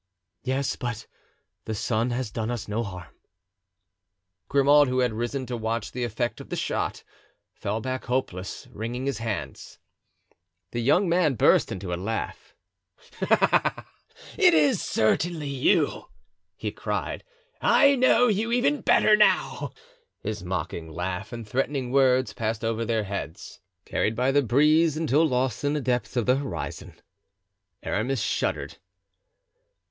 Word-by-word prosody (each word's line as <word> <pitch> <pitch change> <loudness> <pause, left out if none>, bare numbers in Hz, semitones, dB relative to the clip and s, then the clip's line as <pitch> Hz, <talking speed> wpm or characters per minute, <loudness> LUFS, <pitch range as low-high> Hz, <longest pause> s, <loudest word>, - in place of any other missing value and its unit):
"Yes, 135 +1 -1
but 120 -4 -5 0.6
the 110 - -3
son 115 +3 0
has 120 -2 -3
done 110 0 -3
us 120 -4 -4
no 105 +2 -1
harm." 90 -5 -7 1.3
Grimaud, 145 +1 +5
who 130 0 -1
had 125 -3 +2
risen 120 +4 -3
to 125 0 -4
watch 115 0 -3
the 125 - -3
effect 120 +1 -2
of - - -12
the - - -3
shot, - - -2 0.5
fell 105 +3 -3
back 130 +2 -4
hopeless, 100 -7 -3
wringing 120 +4 -4
his 140 -3 -2
hands. 105 - -5 0.9
The 120 - -2
young 175 - +3
man 170 -5 +2
burst - - +4
into 90 -1 -4
a 85 - -3
laugh. 110 +3 -4 0.7
"Ah, - - +2 0.5
it 360 -3 +6
is 260 -9 +3
certainly 155 +7 0
you!" 135 -1 +1 0.5
he - - -4
cried. - - -4 0.4
"I 280 -1 +5
know 245 -1 +4
you 220 +1 0
even 250 +4 +2
better 215 - +5
now." 210 0 +2 0.5
His 105 -3 -4
mocking 85 -2 -4
laugh 90 +5 -4
and 115 -3 -7
threatening 130 +2 -1
words 130 -3 +3
passed 110 -1 -2
over 115 0 -1
their 115 -1 0
heads, 100 -5 -6 0.3
carried 110 - 0
by 125 +3 +2
the 145 +1 +4
breeze, 150 +5 +3
until 160 0 +3
lost 130 0 -1
in 145 0 +1
the 150 - 0
depths 125 -1 -1
of 120 - +1
the 125 +1 +3
horizon. 140 -1 -5 0.9
Aramis 120 +2 -1
shuddered. - - -2
125 Hz, 140 wpm, -26 LUFS, 110-140 Hz, 1.3 s, it